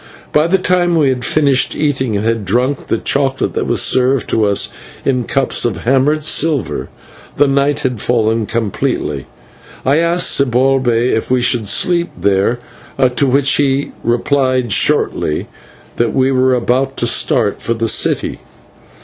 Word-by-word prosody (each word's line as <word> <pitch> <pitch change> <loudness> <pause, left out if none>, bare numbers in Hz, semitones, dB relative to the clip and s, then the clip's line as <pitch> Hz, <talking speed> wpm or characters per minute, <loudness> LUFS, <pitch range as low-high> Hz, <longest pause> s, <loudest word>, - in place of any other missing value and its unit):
By 150 +2 +2
the 190 +3 +2
time 180 -2 +1
we 150 -4 +2
had 125 -2 -2
finished 140 -3 +1
eating 130 -7 -1
and 105 - -3
had 115 -1 -1
drunk 125 +8 -1
the - - 0
chocolate 135 +2 -1
that - - -2
was - - +1
served 130 0 +2
to 110 - +2
us 100 -1 +1 0.3
in 125 -3 0
cups 135 +1 0
of 120 - -3
hammered 135 +5 +1
silver, 160 -2 0 0.5
the 145 - +4
night 140 +1 +1
had 125 -6 -3
fallen 115 -2 0
completely. 110 -4 -3 0.6
I 135 +3 +3
asked 170 +2 +2
Zibalbay 125 -2 +1
if 110 - -2
we 125 -1 +1
should 120 -4 0
sleep 170 +5 +1
there, 100 +4 +1 0.6
to 140 - +2
which 135 +1 +2
he 140 -1 0
replied 130 0 0
shortly 75 -4 +1 0.5
that 115 -2 0
we 130 0 +2
were 130 0 +2
about 130 +2 -1
to - - -1
start - - +1
for 115 - -2
the 115 0 -2
city. - - +1
130 Hz, 155 wpm, -15 LUFS, 120-140 Hz, 0.6 s, the